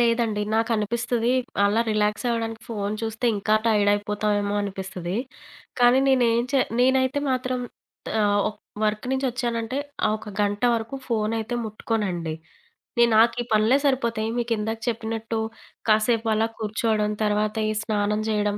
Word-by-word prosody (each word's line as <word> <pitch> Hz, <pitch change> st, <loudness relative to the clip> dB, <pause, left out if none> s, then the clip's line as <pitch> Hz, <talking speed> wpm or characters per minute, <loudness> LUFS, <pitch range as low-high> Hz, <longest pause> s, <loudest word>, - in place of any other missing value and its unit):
లేదండి. 230 Hz, -3 st, +2 dB
నాకనిపిస్తది. 230 Hz, +2 st, 0 dB, 0.3 s
అలా 205 Hz, +3 st, +3 dB
రిలాక్సవ్వడానికి 225 Hz, +2 st, -1 dB
ఫోను 210 Hz, -2 st, -2 dB
చూస్తే 225 Hz, +2 st, -2 dB
ఇంకా 215 Hz, +2 st, +1 dB
టైడయిపోతామేమో 205 Hz, -1 st, +1 dB
అనిపిస్తది. 190 Hz, -2 st, -4 dB, 0.6 s
కానీ 245 Hz, +1 st, +6 dB
నేనే 255 Hz, -3 st, +4 dB, 0.2 s
చే 275 Hz, -, +4 dB, 0.2 s
నేనైతే 260 Hz, +2 st, +3 dB
మాత్రం 255 Hz, 0 st, -1 dB, 0.6 s
ఆహ్, 205 Hz, -1 st, +3 dB
ఒక్ 210 Hz, 0 st, -9 dB, 0.2 s
వర్క్ 215 Hz, +2 st, 0 dB
నుంచి 265 Hz, +1 st, 0 dB
వచ్చానంటే, 235 Hz, 0 st, -2 dB, 0.3 s
ఆ -, -, +2 dB
ఒక 220 Hz, -, -11 dB
గంట 205 Hz, +2 st, 0 dB
వరకు 230 Hz, +4 st, -3 dB
ఫోనైతే 225 Hz, 0 st, -1 dB
ముట్టుకోనండి. 205 Hz, -7 st, -2 dB, 0.6 s
నే 235 Hz, -, +6 dB
నాకు 230 Hz, +2 st, +5 dB
ఈ -, -, -2 dB
పనులే 215 Hz, +5 st, +4 dB
సరిపోతాయి, 235 Hz, -5 st, +1 dB
మీ 240 Hz, -, +1 dB
కిందాక 220 Hz, 0 st, -1 dB
చెప్పినట్టు 225 Hz, 0 st, -2 dB, 0.5 s
కాసేపు 220 Hz, +1 st, +3 dB
అలా 220 Hz, +1 st, +2 dB
కూర్చోవడం, 215 Hz, -1 st, 0 dB
తర్వాత 210 Hz, +1 st, +1 dB
ఈ -, -, +1 dB
స్నానం 210 Hz, -1 st, 0 dB
చేయడం, 210 Hz, -1 st, 0 dB
220 Hz, 130 wpm, -24 LUFS, 210-235 Hz, 0.6 s, కానీ